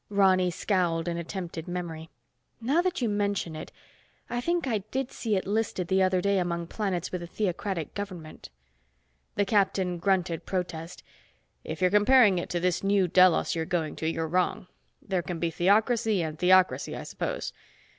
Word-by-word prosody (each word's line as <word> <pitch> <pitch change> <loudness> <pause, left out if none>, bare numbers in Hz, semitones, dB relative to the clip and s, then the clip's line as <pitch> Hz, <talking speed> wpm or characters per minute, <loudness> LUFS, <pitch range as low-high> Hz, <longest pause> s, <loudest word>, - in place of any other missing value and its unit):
Ronny 190 -3 +4
scowled 175 -2 0
in 170 0 -1
attempted 170 -1 -5
memory. 170 -3 -5 0.5
"Now 275 +9 +2
that 360 -6 -1
you - - +2
mention 200 -5 -1
it, 155 - -8 0.6
I 240 0 -1
think 345 +4 0
I 230 -5 0
did 265 +1 -2
see 220 -3 -1
it 190 - -1
listed 205 -4 -1
the 190 0 +3
other 185 -1 +2
day 200 0 +2
among 170 -1 -2
planets 185 -2 -3
with 180 - -3
a 170 - -6
theocratic 180 -3 -3
government." 185 -6 -7 0.9
The 205 - +2
captain 190 -3 +1
grunted 180 -3 0
protest. 175 -2 -4 0.6
"If - - -6
you're 180 -1 +3
comparing 210 -2 +5
it - - -5
to 175 - -1
this 180 +1 0
New 195 -1 +3
Delos 180 0 +4
you're 165 - -1
going 165 -3 -2
to, 160 - -1
you're 165 0 -2
wrong. 180 +2 0 0.4
There 190 -2 -1
can 170 +1 -5
be 165 0 -1
theocracy 210 +3 +2
and 155 -1 -5
theocracy, 185 +1 +3
I - - -6
suppose. - - -4
185 Hz, 170 wpm, -27 LUFS, 170-205 Hz, 0.9 s, comparing